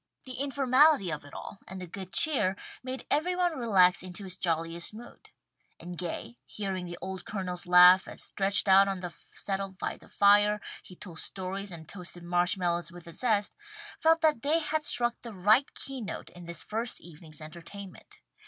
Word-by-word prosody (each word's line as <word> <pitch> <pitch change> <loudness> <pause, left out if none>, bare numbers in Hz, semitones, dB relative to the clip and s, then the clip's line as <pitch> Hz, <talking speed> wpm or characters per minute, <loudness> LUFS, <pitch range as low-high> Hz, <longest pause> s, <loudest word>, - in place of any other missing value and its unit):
The 255 -1 -8
informality 275 - +3
of 150 -2 -5
it 145 - -13
all, 200 - -8
and 190 - -8
the 185 - -6
good 185 +2 -8
cheer, 265 - +4 0.3
made 260 +1 -5
every 335 +5 +1
one 355 -2 +1
relax 195 -7 +4
into 185 +2 -6
his 185 -2 -6
jolliest 165 +1 -2
mood, 235 +2 -13 0.5
and 175 +1 -8
Gay, 165 -9 -6
hearing 190 +2 -4
the 175 0 -7
old 190 0 -5
Colonel's 180 -4 -4
laugh, 180 +1 +8
as - - -5
stretched 200 +1 +2
out 195 +1 +7
on 195 -2 -3
the 175 -2 -6 0.2
settle 195 0 -3
by 185 - -4
the - - -18
fire, 205 +1 +4 0.2
he 180 - -13
told 175 -3 -9
stories 195 +1 -3
and 160 -2 -9
toasted 175 -2 -7
marsh 175 +3 +1
mallows 175 -2 -1
with 175 -1 -12
a 170 - -10
zest, 215 -3 +1 0.4
felt 325 +1 +4
that 310 -7 +3
they 295 +4 +3
had 310 -1 -1
struck 240 -4 +2
the 235 -2 -8
right 215 +8 +3
key 270 -2 -4
note 210 - -6
in 175 -1 -12
this 170 -1 -4
first 225 +2 -3
evening's 160 -2 -11
entertainment. 175 +5 -11
195 Hz, 185 wpm, -29 LUFS, 175-235 Hz, 0.5 s, laugh